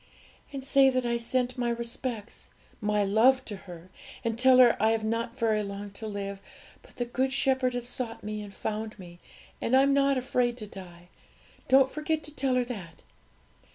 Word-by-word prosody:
'And 275 -2 -6
say 270 0 +6
that 255 -1 0
I 235 0 +1
sent 250 +2 -1
my 240 -1 0
respects 235 -1 -4 0.3
my 210 -1 +1
love 240 +6 +4
to 210 - -6
her; 180 -2 -12 0.3
and 230 -2 -1
tell 255 +2 +5
her 245 -2 +7
I 220 - +4
have 225 -1 -1
not 230 +2 -2
very 220 -3 +1
long 200 0 -6
to 220 +3 -7
live, 200 -1 -5 0.4
but - - -20
the 245 - -2
Good 260 +2 -1
Shepherd 260 -1 +1
has 245 -1 -3
sought 240 -2 -4
me 210 0 -4
and 205 -1 -9
found 215 +2 -4
me, 175 -3 -12 0.4
and 255 +3 +3
I'm 275 +1 +4
not 275 -1 +3
afraid 245 -1 0
to 215 - -6
die. 175 -3 -12 0.6
Don't 265 0 +5
forget 310 0 -2
to 300 - -7
tell 260 -2 +1
her 250 -1 +2
that.' 195 -10 -8
235 Hz, 190 wpm, -28 LUFS, 210-255 Hz, 0.6 s, her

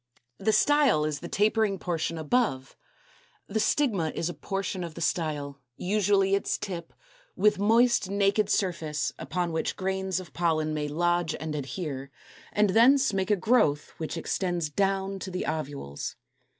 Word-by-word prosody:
The 220 - +2
Style 285 - +4
is 150 -2 -2
the 175 - -7
tapering 210 +1 +2
portion 165 -2 -2
above: 155 - 0 0.7
the 220 +2 -2
Stigma 210 - +1
is 165 - -1
a - - -4
portion 195 -1 -3
of 165 -2 -7
the - - -7
style, 150 -4 -2 0.2
usually 195 0 +2
its 200 - +1
tip, 180 -5 -6 0.4
with 210 -2 +3
moist 225 0 +3
naked 200 +1 +2
surface, 160 -7 -1
upon 175 -2 -2
which 160 - -1
grains 190 -1 -1
of 175 -6 -11
pollen 155 -3 0
may 150 -1 -2
lodge 175 +1 0
and 155 0 -4
adhere, 140 -1 -4 0.4
and 210 -2 +2
thence 260 +3 +5
make 190 0 -1
a 210 - +5
growth 185 -9 +2
which 160 +1 -4
extends 175 -2 -2
down 195 +2 0
to 190 - -6
the 185 0 -3
ovules. 145 - -4
180 Hz, 150 wpm, -27 LUFS, 155-200 Hz, 0.7 s, thence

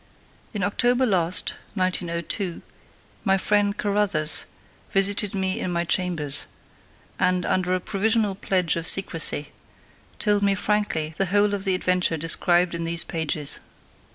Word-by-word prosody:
In 205 -5 -3
October 245 +6 +2
last 180 -5 +2 0.2
(1902), 180 0 -2 0.6
my 195 -2 +3
friend 205 +1 +1
"Carruthers" 200 -7 0 0.5
visited 200 0 +2
me 190 -1 -1
in 180 - -3
my 170 0 0
chambers, 165 -5 -1 0.7
and, 185 0 +1
under 185 0 0
a - - -1
provisional 215 +2 0
pledge 185 -4 0
of 165 0 -4
secrecy, 165 -5 +2 0.7
told 205 -2 +1
me 200 -1 +2
frankly 190 -7 -1
the 195 - +1
whole 205 +2 +2
of 200 0 -2
the 190 -1 +2
adventure 180 -2 +1
described 175 +2 +2
in 170 0 -3
these 165 0 +2
pages. 155 -3 -1
185 Hz, 130 wpm, -24 LUFS, 170-205 Hz, 0.7 s, my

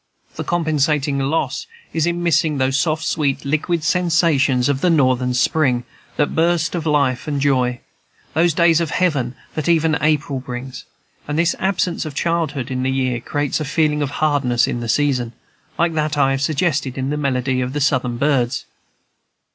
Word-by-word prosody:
The - - -4
compensating 150 -4 0
loss 140 - -1 0.3
is 165 0 +1
in 175 0 -1
missing 160 -3 +2
those 135 +1 +1
soft, 155 +1 0
sweet, 140 -2 -1
liquid 155 +3 -1
sensations 165 -8 +2
of 140 -1 0
the 180 - +3
Northern 130 -5 +2
spring, 125 -1 +2 0.3
that 145 - +1
burst 165 0 +1
of 165 -3 -3
life 140 -3 +1
and 145 -2 -1
joy, 130 -3 +1 0.5
those 165 0 +2
days 170 -1 +4
of 165 - -1
heaven 145 -9 0 0.2
that 155 +2 -2
even 160 -2 +2
April 150 -3 +1
brings; 125 +1 -7 0.4
and 150 +1 -2
this 170 +1 +2
absence 185 -2 0
of 155 -3 -7
childhood 155 -6 -1
in 130 0 -2
the 130 - 0
year 130 -2 0
creates 145 +5 -2
a - - -2
feeling 150 +1 +1
of 145 - -1
hardness 140 -5 +1
in 120 - -2
the 120 -1 -5
season, 125 -2 +1 0.4
like 170 0 +1
that 155 -1 -1
I 135 -1 +3
have 135 0 -1
suggested 140 -3 0
in 135 +1 -2
the - - -1
melody 130 -2 0
of 125 +1 -3
the 145 - -1
Southern 130 -4 0
birds. 130 -3 0
145 Hz, 175 wpm, -20 LUFS, 130-160 Hz, 0.5 s, days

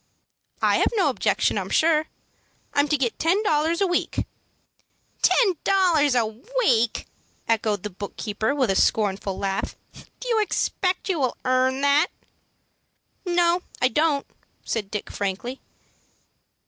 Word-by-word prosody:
"I - - +4
have - - +2
no 405 - +3
objection, - - +1
I'm - - -5
sure. 315 -1 +2 0.7
I'm 285 +1 +3
to 300 - +1
get 250 -4 -2
ten 370 +6 +2
dollars 325 -1 +1
a - - +4
week." 355 -1 -1 1.0
"Ten 390 -8 +3
dollars 335 -8 +3
a 235 -2 +3
week!" 240 - 0 0.4
echoed 215 -3 0
the 210 - -5
book 200 +2 -8
keeper, 220 +5 -1
with 260 -8 +1
a - - 0
scornful 195 -2 +1
laugh. 195 -1 -2 0.4
"Do - - -7
you 455 -3 +2
expect 375 -3 -1
you 365 -5 0
will 260 -3 0
earn 255 +1 +2
that?" 285 +4 +4 1.2
"No, 350 0 +2 0.2
I 250 - +3
don't," 295 +2 +1 0.4
said 210 -4 -3
Dick, 210 -1 -5
frankly. 205 +6 -4
280 Hz, 135 wpm, -24 LUFS, 220-345 Hz, 1.2 s, I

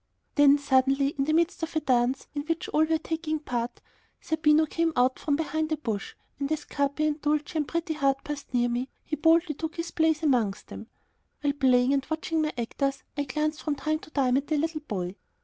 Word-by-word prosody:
Then, 290 -1 +6
suddenly, 275 0 +2
in 275 -1 -2
the 310 - +1
midst 335 +2 +1
of 325 0 -4
a - - +3
dance 255 -2 +1
in 290 - -2
which 330 0 -1
all 310 +1 +3
were 320 0 +1
taking 315 0 -2
part, 245 -5 -4 0.4
Zerbino 315 0 +3
came 330 +1 0
out 250 +1 +2
from 290 - 0
behind 315 0 -1
a 310 - +1
bush, 220 -9 -4 0.2
and 280 +1 -2
as 305 -1 -1
Capi 285 +2 0
and 300 0 -1
Dulcie 300 +1 0
and 295 - -1
Pretty 335 -1 -2
Heart 275 -3 +1
passed 295 -1 -6
near 245 -1 +2
him, 245 +2 -1 0.2
he 305 - -2
boldly 325 +1 +3
took 320 +3 -5
his 335 0 -4
place 320 -1 +1
amongst 235 -9 +1
them. 225 - -8 0.5
While 290 -1 +1
playing 260 -2 +3
and 275 -1 +1
watching 315 0 -1
my 305 -1 0
actors, 275 +4 -2
I 285 -1 -1
glanced 305 +3 -2
from 300 -2 -1
time 310 +2 -1
to - - -14
time 260 -4 +2
at 280 - -2
the 310 - +1
little 315 +1 -1
boy. 190 -8 -4
295 Hz, 215 wpm, -27 LUFS, 270-315 Hz, 0.5 s, Then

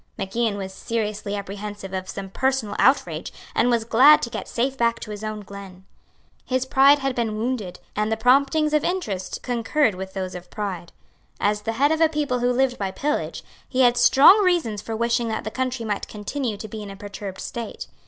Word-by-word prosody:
Mac 195 +1 -5
Ian 230 -3 +1
was 190 -1 -6
seriously 210 -1 -3
apprehensive 200 0 -6
of 185 0 -4
some 195 -1 -6
personal 260 -3 0
outrage, 265 +3 +2 0.2
and 245 - +2
was 235 -2 +2
glad 260 +7 +7
to 235 - -3
get - - -5
safe 260 +3 -1
back 235 -2 +1
to 215 - -7
his 210 0 -7
own 215 -1 -4
glen. 195 -2 -11 0.6
His 255 0 -1
pride 275 +2 +6
had 270 -2 -1
been 225 -3 -2
wounded; 220 -5 -3 0.2
and 210 +1 0
the 220 - +1
promptings 280 +6 +3
of 300 - +3
interest 210 - -3
concurred 245 +1 +1
with 190 +1 -7
those 185 -1 -4
of 180 0 -9
pride. 185 -5 -5 0.5
As 210 0 +1
the 225 +2 -3
head 280 +6 +2
of 320 0 0
a 325 - +5
people 295 -5 -1
who 245 +1 +2
lived 250 0 +1
by 195 -2 -1
pillage, 295 +10 -2 0.3
he 260 0 +1
had 245 -1 +5
strong 285 - +7
reasons 330 - +1
for 225 - -5
wishing 235 +1 0
that 220 -1 -3
the 215 - -5
country 255 -2 -2
might 205 -2 -2
continue 215 +2 -4
to 215 - -7
be 215 +1 -7
in 205 - -7
a 195 - -8
perturbed 200 -1 -8
state. 230 -3 -6
225 Hz, 205 wpm, -23 LUFS, 205-260 Hz, 0.6 s, glad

